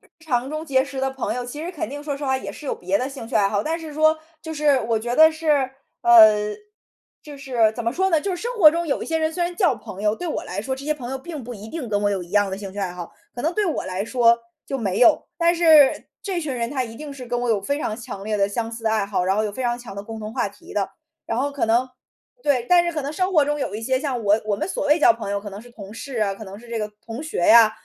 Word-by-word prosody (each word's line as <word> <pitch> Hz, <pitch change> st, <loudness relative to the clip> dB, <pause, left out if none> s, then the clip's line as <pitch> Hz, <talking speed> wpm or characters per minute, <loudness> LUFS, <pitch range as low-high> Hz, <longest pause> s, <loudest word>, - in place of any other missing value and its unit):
日 -, -, -26 dB
常 265 Hz, -5 st, -1 dB
中 310 Hz, +1 st, -4 dB
结 265 Hz, -3 st, +2 dB
识 275 Hz, -1 st, -6 dB
的 270 Hz, 0 st, 0 dB
朋 265 Hz, -3 st, -3 dB
友， 245 Hz, 0 st, -3 dB
其 290 Hz, +6 st, -7 dB
实 350 Hz, -, -4 dB
肯 300 Hz, -10 st, -4 dB
定 290 Hz, +3 st, -7 dB
说 290 Hz, -2 st, -3 dB
实 285 Hz, -, -6 dB
话， 265 Hz, -1 st, +1 dB
也 -, -, -6 dB
是 300 Hz, -, -10 dB
有 -, -, -1 dB
别 190 Hz, +2 st, -1 dB
的 255 Hz, -, -2 dB
兴 265 Hz, -5 st, -8 dB
趣 250 Hz, -, -7 dB
爱 200 Hz, -2 st, +4 dB
好。 205 Hz, 0 st, 0 dB
但 325 Hz, +2 st, -2 dB
是 320 Hz, -2 st, -8 dB
说 315 Hz, +1 st, +3 dB, 0.2 s
就 320 Hz, -1 st, -7 dB
是 290 Hz, -3 st, +3 dB
我 225 Hz, 0 st, 0 dB
觉 240 Hz, +2 st, -3 dB
得 315 Hz, 0 st, +8 dB
是， 315 Hz, 0 st, -5 dB, 0.5 s
呃 215 Hz, -3 st, +7 dB, 0.7 s
就 295 Hz, -1 st, -10 dB
是 245 Hz, -5 st, +2 dB
怎 235 Hz, -, -4 dB
么 230 Hz, -, 0 dB
说 380 Hz, +7 st, +1 dB
呢？ 320 Hz, -3 st, +3 dB
就 385 Hz, +3 st, -2 dB
是 350 Hz, -, -7 dB
生 480 Hz, +2 st, -2 dB
活 330 Hz, -8 st, +9 dB
中 335 Hz, +1 st, -2 dB
有 280 Hz, -, -1 dB
一 -, -, -5 dB
些 325 Hz, -, 0 dB
人， 315 Hz, 0 st, 0 dB
虽 350 Hz, -, -2 dB
然 345 Hz, 0 st, -2 dB
叫 355 Hz, -, +3 dB
朋 200 Hz, -1 st, -9 dB
友， 210 Hz, 0 st, +2 dB
对 355 Hz, -, -5 dB
我 315 Hz, -, -2 dB
来 185 Hz, +3 st, -4 dB
说 265 Hz, +5 st, -3 dB
这 275 Hz, -, -9 dB
些 305 Hz, -, +1 dB
朋 250 Hz, -4 st, -7 dB
友， 270 Hz, -, -3 dB
并 305 Hz, 0 st, -7 dB
不 245 Hz, 0 st, -7 dB
一 210 Hz, +2 st, -10 dB
定 295 Hz, -5 st, -5 dB
跟 205 Hz, -1 st, 0 dB
我 205 Hz, -, +2 dB
有 195 Hz, -3 st, -1 dB
一 175 Hz, -, -12 dB
样 205 Hz, 0 st, +2 dB
的 190 Hz, -, -4 dB
兴 195 Hz, -2 st, -7 dB
趣 205 Hz, -, -9 dB
爱 190 Hz, -3 st, -2 dB
好。 175 Hz, -1 st, -8 dB, 0.2 s
可 245 Hz, -, -5 dB
能 330 Hz, +3 st, 0 dB
对 425 Hz, -, +1 dB
我 330 Hz, -, -2 dB
来 185 Hz, +2 st, -3 dB
说， 235 Hz, -1 st, +4 dB, 0.3 s
就 270 Hz, -, -2 dB
没 200 Hz, -4 st, -1 dB
有。 290 Hz, +5 st, +5 dB
但 340 Hz, 0 st, +3 dB
是 315 Hz, -5 st, +5 dB
这 375 Hz, -4 st, -2 dB
群 305 Hz, -4 st, -3 dB
人， 235 Hz, -1 st, -2 dB
他 270 Hz, -2 st, -1 dB
一 225 Hz, -1 st, -9 dB
定 295 Hz, +1 st, -7 dB
是 270 Hz, -2 st, -9 dB
跟 240 Hz, 0 st, -2 dB
我 245 Hz, -, -2 dB
有 220 Hz, -3 st, +2 dB
非 280 Hz, +8 st, -1 dB
常 215 Hz, -7 st, -3 dB
强 200 Hz, -4 st, -8 dB
烈 215 Hz, 0 st, -1 dB
的、 200 Hz, 0 st, +2 dB
相 225 Hz, +2 st, -3 dB
似 230 Hz, 0 st, -8 dB
的 220 Hz, -, +2 dB
爱 215 Hz, -2 st, +1 dB
好， 195 Hz, -3 st, -1 dB
然 190 Hz, +2 st, +1 dB
后 215 Hz, -, +1 dB
有 210 Hz, -, -3 dB
非 260 Hz, -, -5 dB
常 240 Hz, -1 st, 0 dB
强 240 Hz, -5 st, -10 dB
的 200 Hz, -, -6 dB
共 225 Hz, +1 st, -8 dB
同 215 Hz, 0 st, -6 dB
话 -, -, 0 dB
题 200 Hz, -, -14 dB
的。 195 Hz, -2 st, -1 dB, 0.3 s
然 230 Hz, -, -2 dB
后 280 Hz, +2 st, 0 dB
可 280 Hz, -, 0 dB
能 235 Hz, +3 st, +2 dB, 0.5 s
对， 255 Hz, -5 st, +1 dB
但 350 Hz, -1 st, +6 dB
是 345 Hz, -, -1 dB
可 305 Hz, -3 st, -3 dB
能 280 Hz, +2 st, -4 dB
生 370 Hz, +4 st, -1 dB
活 305 Hz, -5 st, +5 dB
中 295 Hz, +1 st, -1 dB
有 205 Hz, -, -2 dB
一 215 Hz, -, -4 dB
些， 260 Hz, +3 st, 0 dB
像 270 Hz, -5 st, -2 dB
我 205 Hz, +2 st, +4 dB
我 210 Hz, -1 st, 0 dB
们 315 Hz, -, -2 dB
所 295 Hz, -, -2 dB
谓 300 Hz, +3 st, +5 dB
交 300 Hz, -, +6 dB
朋 225 Hz, -3 st, -6 dB
友， 200 Hz, 0 st, -1 dB
可 205 Hz, -, -8 dB
能 200 Hz, +2 st, -9 dB
是 245 Hz, -, -15 dB
同 210 Hz, -3 st, -11 dB
事 255 Hz, +3 st, -7 dB
啊， 200 Hz, -2 st, +1 dB
可 195 Hz, -, -11 dB
能 195 Hz, 0 st, -9 dB
是 240 Hz, +1 st, -15 dB
这 235 Hz, -, -4 dB
个 210 Hz, -1 st, -2 dB, 0.2 s
同 230 Hz, +5 st, -6 dB
学 310 Hz, -, -5 dB
啊。 225 Hz, +3 st, +7 dB
245 Hz, 340 characters per minute, -23 LUFS, 215-300 Hz, 0.7 s, 活